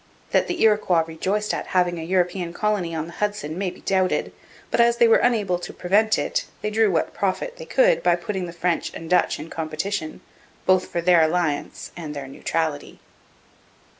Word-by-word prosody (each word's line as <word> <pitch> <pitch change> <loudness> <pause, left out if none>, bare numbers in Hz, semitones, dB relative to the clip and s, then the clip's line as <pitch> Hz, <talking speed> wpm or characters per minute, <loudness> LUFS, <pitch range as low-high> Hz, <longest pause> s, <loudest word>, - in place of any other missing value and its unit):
That - - +2
the 350 - -3
Iroquois 210 -6 +3
rejoiced 190 +6 -2
at - - -4
having 175 -1 +2
a - - -5
European 180 0 0
colony 195 -5 -1
on 160 -1 -2
the 170 - -10
Hudson 205 -7 -3
may 190 +1 -1
be - - -13
doubted, 190 -1 0 0.4
but - - +3
as 235 0 +4
they 235 -1 +6
were 225 - +6
unable 210 -7 +1
to - - -7
prevent 210 +4 +2
it, - - -1 0.2
they 210 - -1
drew 220 0 +3
what 165 -4 0
profit 200 - -2
they - - -8
could - - +3
by 175 - +3
putting 185 +1 -4
the - - -7
French 170 0 -1
and 165 - -7
Dutch 180 - +3
in 155 +2 -9
competition, 160 +2 -4 0.4
both 185 0 +3
for 170 - -2
their 175 -1 +5
alliance 160 -2 -1
and 155 -4 -7
their 140 -1 -6
neutrality. 155 +2 -3
180 Hz, 190 wpm, -23 LUFS, 165-210 Hz, 0.4 s, they